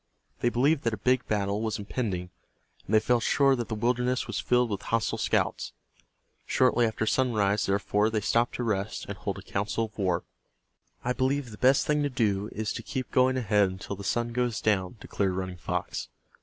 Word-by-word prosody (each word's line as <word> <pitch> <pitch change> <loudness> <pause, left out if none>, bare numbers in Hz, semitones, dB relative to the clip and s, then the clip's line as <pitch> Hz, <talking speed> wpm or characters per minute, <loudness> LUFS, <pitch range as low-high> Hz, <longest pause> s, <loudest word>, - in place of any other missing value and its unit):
They 120 - +2
believed 140 +5 +2
that 115 -1 +1
a 105 - -14
big 125 -2 +3
battle 100 0 0
was 110 -1 -1
impending, 100 -4 -3 0.6
and 110 - +2
they - - +7
felt 120 +2 +2
sure 135 +3 +3
that 120 -2 -3
the 110 - -3
wilderness 125 +3 0
was - - -3
filled 125 -2 +2
with 100 - -2
hostile 115 -2 -1
scouts. - - 0 0.7
Shortly 125 -2 +3
after 110 0 -2
sunrise, 105 -5 +1
therefore, 105 +2 +1
they 110 -1 0
stopped 115 +3 +1
to 125 - -2
rest, 105 -2 -2
and - - -5
hold - - -4
a - - -9
council 105 +3 -1
of 110 - -15
war. 90 -3 +1 0.8
"I 125 - 0
believe 130 -1 0
the 105 - -10
best 130 +2 +4
thing 150 0 +1
to 145 - +1
do 105 -5 0
is 110 0 -3
to - - -5
keep 130 +2 -5
going 130 0 +3
ahead 105 -5 +3
until 95 +2 -6
the 100 - -9
sun 120 +3 -1
goes 125 -2 0
down," 100 0 0
declared 95 -2 -1
Running 95 -1 -4
Fox. - - -3
110 Hz, 195 wpm, -28 LUFS, 100-125 Hz, 0.8 s, they